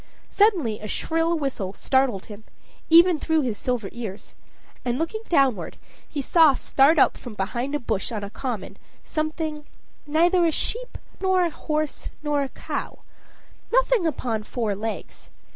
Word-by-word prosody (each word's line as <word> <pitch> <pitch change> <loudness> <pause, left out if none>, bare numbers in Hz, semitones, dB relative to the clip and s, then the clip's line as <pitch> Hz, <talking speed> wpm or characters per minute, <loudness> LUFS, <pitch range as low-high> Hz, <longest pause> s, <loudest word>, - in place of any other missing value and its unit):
Suddenly 350 - +2
a 215 - -6
shrill 330 +8 0
whistle 255 -10 -3
startled 260 -7 +1
him, 210 0 -11 0.5
even 335 0 +7
through 320 0 +1
his 245 -6 -1
silver 245 -5 -1
ears, 220 -4 -7 0.5
and 245 0 -1
looking 330 +8 -2
downward, 275 - +2 0.3
he 285 - -3
saw 315 -2 +5
start 280 +6 +3
up - - +5
from 240 -4 -9
behind 240 +8 -2
a - - 0
bush 220 -5 -2
on 215 -3 -4
a 200 - -6
common, 240 -4 -5 0.3
something 310 -1 -3 0.4
Neither 345 +4 +3
a 330 - +3
sheep 485 +10 -2 0.2
nor 375 -1 +3
a 340 - 0
horse 305 -1 -3
nor 295 -1 +1
a 275 - -2
cow - - -6 0.7
nothing - - +3
upon 240 -7 -2
four 215 -1 -2
legs. 215 +3 -6
285 Hz, 150 wpm, -24 LUFS, 230-330 Hz, 0.7 s, even